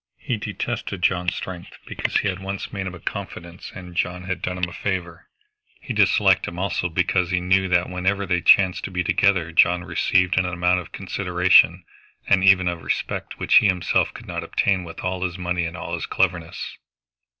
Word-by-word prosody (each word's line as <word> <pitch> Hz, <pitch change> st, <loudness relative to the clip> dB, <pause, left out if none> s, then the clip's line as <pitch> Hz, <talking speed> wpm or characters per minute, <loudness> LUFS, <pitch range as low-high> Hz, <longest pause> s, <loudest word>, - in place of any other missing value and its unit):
He 125 Hz, -, -3 dB
detested 105 Hz, -1 st, -5 dB
John's 90 Hz, -2 st, +1 dB
strength 90 Hz, -2 st, -8 dB
because -, -, -2 dB
he -, -, -2 dB
had 95 Hz, -1 st, -2 dB
once 95 Hz, +1 st, -6 dB
made 95 Hz, -1 st, -3 dB
him 90 Hz, -, -6 dB
a -, -, -11 dB
confidence 85 Hz, +1 st, -7 dB
and 90 Hz, -2 st, -10 dB
John 90 Hz, +1 st, -2 dB
had 95 Hz, -1 st, -4 dB
done 90 Hz, 0 st, -3 dB
him 90 Hz, 0 st, -1 dB
a 90 Hz, -, -10 dB
favor. 90 Hz, -4 st, -4 dB, 0.5 s
He 120 Hz, -, -6 dB
disliked 100 Hz, -2 st, +3 dB
him 85 Hz, -, -7 dB
also 90 Hz, -1 st, -1 dB
because 90 Hz, +1 st, 0 dB
he 95 Hz, -1 st, +1 dB
knew 95 Hz, +1 st, +2 dB
that 90 Hz, -1 st, +2 dB
wherever 95 Hz, +2 st, -1 dB
they 90 Hz, -3 st, 0 dB
chanced 95 Hz, 0 st, +4 dB
to -, -, -5 dB
be 90 Hz, -2 st, -2 dB
together 95 Hz, -3 st, +2 dB
John 90 Hz, +2 st, +3 dB
received 90 Hz, +1 st, +1 dB
an 95 Hz, -, +1 dB
amount 90 Hz, +1 st, +1 dB
of 90 Hz, -, -10 dB
consideration 90 Hz, -2 st, +3 dB, 0.4 s
and 95 Hz, -1 st, +3 dB
even 95 Hz, -2 st, +5 dB
of 85 Hz, -1 st, -2 dB
respect -, -, -3 dB
which -, -, +4 dB
he -, -, +6 dB
himself 90 Hz, -3 st, +1 dB
could -, -, -12 dB
not -, -, -5 dB
obtain 95 Hz, -2 st, 0 dB
with 85 Hz, -, -9 dB
all 90 Hz, 0 st, -3 dB
his 90 Hz, -1 st, -3 dB
money 90 Hz, -1 st, -1 dB
and 85 Hz, +1 st, -6 dB
all 85 Hz, 0 st, -6 dB
his 85 Hz, -, -3 dB
cleverness. 90 Hz, -3 st, -2 dB
90 Hz, 195 wpm, -22 LUFS, 90-95 Hz, 0.5 s, he